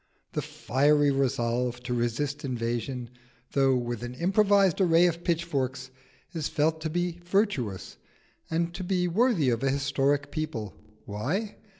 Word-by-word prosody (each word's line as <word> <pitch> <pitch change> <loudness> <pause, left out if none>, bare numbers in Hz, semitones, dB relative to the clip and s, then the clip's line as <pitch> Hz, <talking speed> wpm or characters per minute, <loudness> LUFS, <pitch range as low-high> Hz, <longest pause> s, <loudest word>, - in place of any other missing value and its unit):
The - - -1
fiery 145 +4 +2
resolve 125 -2 0
to 125 - -3
resist 130 +6 -1
invasion, 120 -1 -3 0.4
though 135 -1 +3
with 120 -2 -3
an 120 +1 -6
improvised 195 +2 +3
array 170 -1 +5
of 170 -1 0
pitchforks, 140 -7 -1 0.4
is 160 -3 -2
felt 155 +1 0
to 160 - -2
be 175 +1 -2
virtuous, 175 - -1 0.5
and 170 +1 -1
to 185 - -5
be 180 -1 +1
worthy 180 - +2
of 115 - -1
a 135 - +2
historic 140 +1 0
people. 120 -11 -4 0.3
Why? 150 - -3
145 Hz, 135 wpm, -28 LUFS, 125-170 Hz, 0.5 s, array